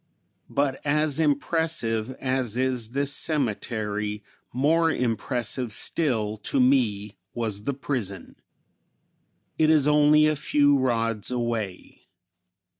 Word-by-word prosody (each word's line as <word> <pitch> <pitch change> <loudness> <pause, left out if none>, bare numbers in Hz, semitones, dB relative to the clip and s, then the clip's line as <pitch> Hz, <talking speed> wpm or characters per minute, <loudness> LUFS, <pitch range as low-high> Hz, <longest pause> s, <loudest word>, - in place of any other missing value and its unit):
But 140 -1 -1
as 150 0 +1
impressive 145 -6 0
as 130 -3 -2
is 125 -3 0
this 140 +3 0
cemetery, 105 -7 -2 0.3
more 160 +6 +2
impressive 120 -1 -2
still 110 -4 -1
to 120 +6 -2
me 115 -6 +1 0.2
was 110 -3 -3
the 140 - -1
prison. 115 -10 -4 1.2
It 155 -1 +4
is 150 -3 +4
only 150 +1 +5
a 155 0 +2
few 145 0 +3
rods 115 -5 0
away. 115 -6 -4
130 Hz, 105 wpm, -25 LUFS, 110-145 Hz, 1.2 s, only